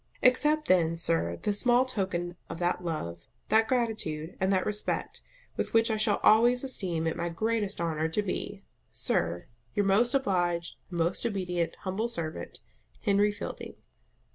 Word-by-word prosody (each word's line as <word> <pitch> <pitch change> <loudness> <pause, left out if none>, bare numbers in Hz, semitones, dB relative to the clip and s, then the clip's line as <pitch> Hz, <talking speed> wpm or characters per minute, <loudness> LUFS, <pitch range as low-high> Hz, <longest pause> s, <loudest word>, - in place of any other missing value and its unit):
Accept 300 +4 +3
then, 170 -2 +3
sir, 85 - 0
this 205 -1 +1
small 245 0 +4
token 185 -7 -2
of 165 - -5
that 175 +1 -1
love, 85 - -4 0.2
that 220 0 +4
gratitude, 215 -11 -1
and 190 +1 +1
that 185 -1 +2
respect, 210 0 -2 0.4
with - - -2
which 225 0 +4
I 220 - 0
shall 210 -1 +2
always 240 +4 +5
esteem 185 -11 -1
it 160 - 0
my 170 0 -2
GREATEST 210 +3 -1
HONOUR 160 -2 0
to 185 +6 -1
be, 200 +1 -4 0.3
Sir, 85 +1 0 0.3
Your 205 - +2
most 235 +6 +4
obliged, 175 -9 0
and 175 - -5
most 170 +2 0
obedient 180 -6 -1
humble 195 +5 -2
servant, 165 -9 -5 0.4
HENRY 205 0 +3
FIELDING. 205 - -7
190 Hz, 155 wpm, -29 LUFS, 170-220 Hz, 0.4 s, always